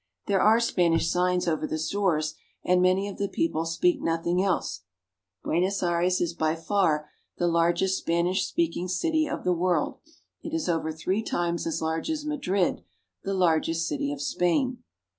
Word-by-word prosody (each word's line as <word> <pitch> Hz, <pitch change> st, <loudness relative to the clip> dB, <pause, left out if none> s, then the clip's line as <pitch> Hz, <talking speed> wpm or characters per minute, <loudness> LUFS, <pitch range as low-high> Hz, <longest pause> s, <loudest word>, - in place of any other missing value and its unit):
There 195 Hz, -2 st, +2 dB
are 220 Hz, +2 st, +5 dB
Spanish 175 Hz, -8 st, +2 dB
signs 180 Hz, 0 st, +1 dB
over 155 Hz, -2 st, 0 dB
the 155 Hz, -, -2 dB
stores, 160 Hz, -2 st, 0 dB, 0.3 s
and 180 Hz, 0 st, +3 dB
many 185 Hz, +2 st, +3 dB
of 200 Hz, -, -8 dB
the 200 Hz, -, 0 dB
people 240 Hz, -, -1 dB
speak 290 Hz, -, +1 dB
nothing 170 Hz, +2 st, 0 dB
else. 195 Hz, -, -1 dB, 0.6 s
Buenos 185 Hz, +4 st, 0 dB
Aires 175 Hz, +1 st, +1 dB
is 170 Hz, -1 st, -1 dB
by 160 Hz, -1 st, 0 dB
far 165 Hz, -3 st, +1 dB, 0.3 s
the 175 Hz, -, +1 dB
largest 170 Hz, +3 st, +2 dB
Spanish 175 Hz, +3 st, 0 dB
speaking 170 Hz, +2 st, -1 dB
city 310 Hz, -, +1 dB
of -, -, -4 dB
the 180 Hz, -, +2 dB
world; 180 Hz, -, 0 dB, 0.4 s
it 320 Hz, -, -5 dB
is 325 Hz, -, -2 dB
over 165 Hz, -2 st, 0 dB
three 185 Hz, +6 st, -1 dB
times 170 Hz, -6 st, -2 dB
as 160 Hz, -, -2 dB
large 160 Hz, -, -2 dB
as 305 Hz, -2 st, -2 dB
Madrid, 200 Hz, -, 0 dB, 0.4 s
the 195 Hz, -, -2 dB
largest 165 Hz, -2 st, +1 dB
city 285 Hz, -1 st, -2 dB
of 290 Hz, 0 st, -4 dB
Spain. 250 Hz, -, 0 dB
180 Hz, 165 wpm, -26 LUFS, 165-200 Hz, 0.6 s, are